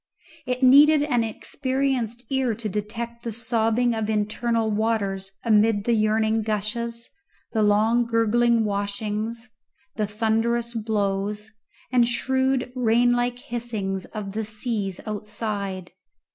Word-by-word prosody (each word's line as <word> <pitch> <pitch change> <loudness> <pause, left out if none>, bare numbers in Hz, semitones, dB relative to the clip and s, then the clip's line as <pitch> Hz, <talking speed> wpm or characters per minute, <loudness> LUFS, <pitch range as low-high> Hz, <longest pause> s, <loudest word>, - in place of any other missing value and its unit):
It 255 +1 -2
needed 290 +3 +7
an 245 -6 +1
experienced 255 0 -2
ear 260 -4 +1
to 220 0 -5
detect 230 +3 -4
the 230 - -4
sobbing 230 +1 +1
of 220 -1 -2
internal 220 +1 0
waters 200 -3 -1
amid 215 -2 +3
the 235 - +1
yearning 220 0 +2
gushes, 230 +2 -2 0.4
the 220 - +1
long 220 +3 +3
gurgling 230 0 +3
washings, 210 +3 -3 0.5
the 215 -2 0
thunderous 225 +2 0
blows, 210 -1 -2 0.4
and 245 -2 +4
shrewd 260 +1 0
rain 240 0 +3
like 245 0 0
hissings 230 -7 -4
of 210 -3 -6
the 220 +2 -3
seas 215 -3 -3
outside. 205 -3 -4
225 Hz, 115 wpm, -24 LUFS, 210-240 Hz, 0.5 s, needed